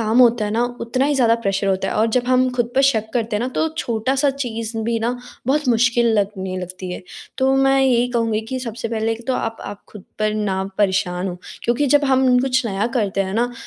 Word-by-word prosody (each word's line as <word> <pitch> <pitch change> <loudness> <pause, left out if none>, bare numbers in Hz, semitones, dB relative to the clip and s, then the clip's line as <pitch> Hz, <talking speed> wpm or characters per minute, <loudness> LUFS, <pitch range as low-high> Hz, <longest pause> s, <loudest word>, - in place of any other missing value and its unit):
काम 225 +2 +1
होता 240 -3 +5
है 210 - -2
ना 230 +3 +1 0.2
उतना 255 +3 0
ही 295 - +1
ज़्यादा 235 -4 +4
प्रेशर 195 0 0
होता 190 -1 0
है - - -3
और 220 +2 +3
जब 245 - +1
हम 255 0 +3
ख़ुद 240 -1 0
पर 270 - +4
शक 220 -3 -2
करते 225 -3 0
है - - -2
ना 245 - -1
तो 320 - +2
छोटा-सा 260 +5 0
चीज़ 230 -4 -4
भी 230 0 0
न 240 - 0 0.3
बहुत 295 +1 +1
मुश्किल 235 0 +3
लगने 190 -2 -2
लगती 185 0 -6
है। - - -7 0.4
तो 265 +1 +3
मैं 270 0 +4
यही 245 -2 +3
कहूँगी 230 -2 0
कि 260 - -2
सबसे 230 -1 -5
पहले 225 0 -1
तो 255 - +2
आप 225 0 -2
आप 205 - -8
ख़ुद 210 -3 -11
पर 215 0 0
ना 195 -3 -1 0.2
परेशान 190 -2 +1
हों 180 - -5 0.3
क्योंकि 245 +5 +1
जब 290 +2 +4
हम 260 -2 +4
कुछ 260 0 +1
नया 200 +1 -1
करते 200 -3 0
है 190 0 -4
ना 245 +2 0
230 Hz, 230 wpm, -20 LUFS, 210-255 Hz, 0.4 s, होता